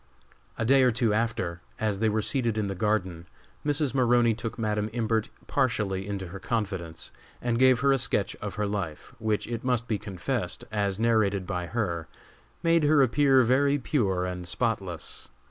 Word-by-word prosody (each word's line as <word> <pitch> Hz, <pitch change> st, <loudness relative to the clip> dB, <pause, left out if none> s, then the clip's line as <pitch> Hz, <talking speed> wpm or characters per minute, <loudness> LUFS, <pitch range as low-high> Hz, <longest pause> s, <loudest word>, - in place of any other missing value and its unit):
A -, -, -1 dB
day 135 Hz, +3 st, +5 dB
or 130 Hz, -, +5 dB
two 115 Hz, -2 st, +1 dB
after, 105 Hz, -6 st, -1 dB, 0.2 s
as 105 Hz, -3 st, 0 dB
they 110 Hz, 0 st, +2 dB
were 110 Hz, 0 st, 0 dB
seated 120 Hz, -5 st, 0 dB
in 105 Hz, -, 0 dB
the 100 Hz, -, -2 dB
garden, 95 Hz, -4 st, -1 dB, 0.4 s
Mrs. 145 Hz, -2 st, 0 dB
Maroney 120 Hz, -3 st, +4 dB
took 115 Hz, 0 st, -5 dB
Madam 105 Hz, -2 st, -1 dB
Imbert 110 Hz, -2 st, 0 dB, 0.2 s
partially 105 Hz, -8 st, 0 dB
into 95 Hz, -3 st, -4 dB
her 95 Hz, +3 st, -7 dB
confidence 95 Hz, -8 st, -3 dB, 0.3 s
and 120 Hz, -1 st, -1 dB
gave 130 Hz, -1 st, +5 dB
her 140 Hz, 0 st, +4 dB
a 135 Hz, -, +3 dB
sketch -, -, 0 dB
of -, -, -6 dB
her 105 Hz, -, -1 dB
life, 100 Hz, -7 st, -4 dB
which, 110 Hz, -2 st, 0 dB
it 115 Hz, -1 st, -4 dB
must 125 Hz, -2 st, 0 dB
be 105 Hz, -3 st, -1 dB
confessed, 100 Hz, +1 st, -3 dB
as 100 Hz, -2 st, 0 dB
narrated 110 Hz, -4 st, +2 dB
by 90 Hz, -2 st, -3 dB
her, 85 Hz, -8 st, -2 dB, 0.6 s
made 165 Hz, 0 st, +4 dB
her 150 Hz, -1 st, +5 dB
appear 135 Hz, +1 st, +4 dB
very 140 Hz, +4 st, +3 dB
pure 100 Hz, -10 st, 0 dB
and 90 Hz, -1 st, -5 dB
spotless. 95 Hz, -5 st, -3 dB
110 Hz, 175 wpm, -27 LUFS, 95-125 Hz, 0.6 s, day